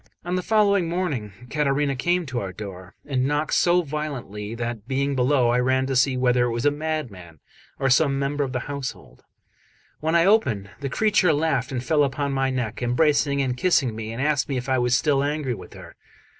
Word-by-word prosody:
On 175 - -3
the 185 - 0
following 200 -4 +2
morning 160 - -2 0.2
Caterina 145 -1 +1
came 175 +6 0
to 130 -4 -3
our 95 -3 -4
door, 95 -1 -9
and 130 -2 0
knocked 150 +2 -1
so 175 0 +3
violently, 130 -9 -5
that, 115 -2 -5
being 140 +1 0
below, 130 -1 +3
I 120 +1 +2
ran 130 +1 +2
to 135 0 -2
see 130 +1 +3
whether 125 -1 +3
it 120 - -1
was 120 +3 -2
a 145 - +5
madman 140 - -5 0.4
or 135 - 0
some 135 0 +3
member 140 +1 -1
of 135 - -3
the 125 -1 -2
household. 140 -1 -7 0.8
When 160 +2 0
I 170 0 +5
opened, 120 - +2
the 140 -1 -3
creature 200 -1 +3
laughed 145 -4 0
and 125 -2 -3
fell 150 +1 +2
upon 140 +1 -1
my 135 0 +1
neck, 125 -4 -3
embracing 140 +2 +2
and 125 -2 -1
kissing 130 -6 +2
me, 110 0 -5
and 115 - -6
asked 145 +1 +1
me 135 - -1
if 125 - -4
I 130 -1 +2
was 120 0 +2
still 140 0 +2
angry 145 -3 -1
with - - -10
her. - - -12
135 Hz, 205 wpm, -24 LUFS, 125-150 Hz, 0.8 s, a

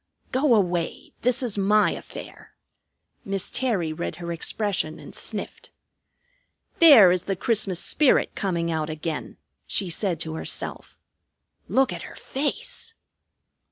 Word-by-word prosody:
"Go 260 -1 +3
away! 175 -5 -1
This 250 +2 +2
is 220 -5 -2
my 210 +2 +4
affair." - - -10 0.7
Miss 195 -1 -3
Terry 210 -11 0
read 170 - -4
her 170 -1 -6
expression 170 -1 -1
and - - -12
sniffed. - - -5 1.1
"There 270 - +9
is 180 -1 0
the 195 - -1
Christmas 195 -3 0
spirit 290 +6 +3
coming 170 -4 -1
out 160 -1 -2
again," 155 0 -5 0.3
she 190 -3 -2
said 175 -2 -1
to 160 -1 -3
herself. 160 - -3 0.7
"Look 265 0 +2
at - - -6
her - - -10
face!" 455 - -4
195 Hz, 125 wpm, -25 LUFS, 170-250 Hz, 1.1 s, There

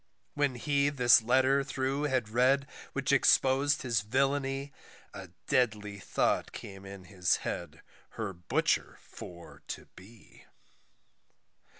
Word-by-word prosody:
When 145 -3 0
he 140 +3 +1
this 125 -4 +5
letter 130 +4 +3
through 135 +2 -2
had 130 -6 0
read, 130 +5 +2 0.3
which - - -1
expos'd 135 +2 +3
his 120 -4 +1
villainy, 135 +4 -1 0.4
A - - -8 0.2
deadly 105 -4 0
thought - - 0
came 95 0 -10
in 100 -1 -10
his 90 -2 0
head 80 -2 -5 0.3
her 110 -4 -3
butcher 90 0 -1
for 85 -1 -12
to - - -6
be. 105 +3 -17
125 Hz, 115 wpm, -30 LUFS, 100-135 Hz, 0.4 s, this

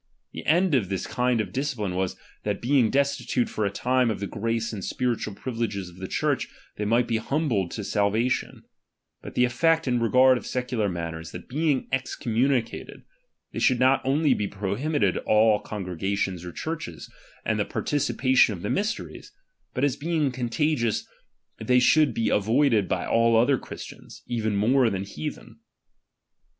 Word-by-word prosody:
The - - -7
end 175 +2 +3
of 110 -9 +2
"this 95 -2 -2
kind 125 -1 0
of 100 -4 -3
discipline 125 -9 -2
was, 95 0 -1 0.3
that 105 -1 -2
being 125 -2 +3
destitute 140 -2 +1
for 105 -2 -1
s. 100 - -5
time 125 -1 +2
of 110 - -2
the 100 - -3
grace 115 +2 -2
and 100 -3 -5
spiritual 120 -5 -2
pri\'ileges 115 -7 -3
of 85 - -17
the 95 0 -6
Church, - - 0 0.3
they 105 - -2
might 115 +3 +3
be 115 -1 +1
humbled 115 - 0
to 105 - -5
salvation; 105 +5 0 0.6
but - - -10
"the 125 - +4
effect 160 +6 +2
in 125 -1 +2
regard 125 +2 +5
of - - -10
secular 125 -4 -1
matters, 85 -2 -5
that 90 - -8
being 145 0 0
excommunicated, 125 -1 -1 0.5
they - - -3
should 130 -3 +3
not 130 +1 +4
only 140 +2 +3
be 105 -4 -1
prohi 100 +10 -3
"bited 105 - +2
all 110 -1 +3
congregations 95 -2 -3
or 90 - -6
churches, 150 - -5 0.4
and - - 0
the - - +3
parti 145 - -2
cipation 130 -4 +3
of 90 -2 -8
the 105 - -1
mysteries, 210 +2 -3 0.4
but 130 - -1
as 140 -3 +2
being 155 -2 0
contagious 125 0 0 0.5
they 125 +3 +2
should 150 +4 +4
be 115 - +1
avoided 110 0 +2
by - - -1
all 115 0 +3
other 125 +3 +3
Christians, - - -10
even 110 -4 -1
:inore 125 +3 +4
than 95 -1 -2
heathen. 90 -6 -7
115 Hz, 165 wpm, -25 LUFS, 100-135 Hz, 0.6 s, regard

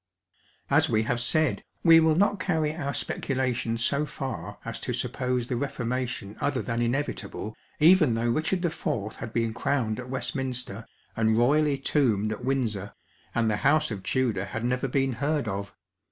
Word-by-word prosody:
At - - +4
we 110 0 +2
have 120 +2 -1
said, 130 -4 +2 0.2
we 165 -1 +8
will 160 -1 +4
not 205 +2 +2
curry 160 -5 0
our 140 -4 -2
speculation 125 -5 -1
so 140 +5 +1
far 105 - -5
as - - -4
to - - -3
»»ppo 125 0 -1
*te 120 - -4
the 125 - -2
Reformation 125 -5 -3
other 140 -2 0
than 115 -1 -2
inevitable, 120 -3 -2 0.2
even 155 -6 +6
though 115 +1 +1
Kicburd 175 +1 0 0.4
IV, - - -16
bad 110 - -6
been 115 -1 0
crowned 115 -2 -1
at 125 0 -7
Westminster, 125 -3 -3 0.3
and 110 -1 +2
royally 145 +4 +3
tombed 115 -7 +1
at 110 +3 -5
Windsor, 115 -7 -1 0.4
and 115 -1 +2
the 110 -1 +1
House 150 +3 +3
of 100 -3 -4
Tudor 100 -1 0
had 115 +3 -4
never 125 +2 0
been 135 0 +1
heard 145 +1 -1
of. 100 0 -3
125 Hz, 170 wpm, -27 LUFS, 115-140 Hz, 0.4 s, we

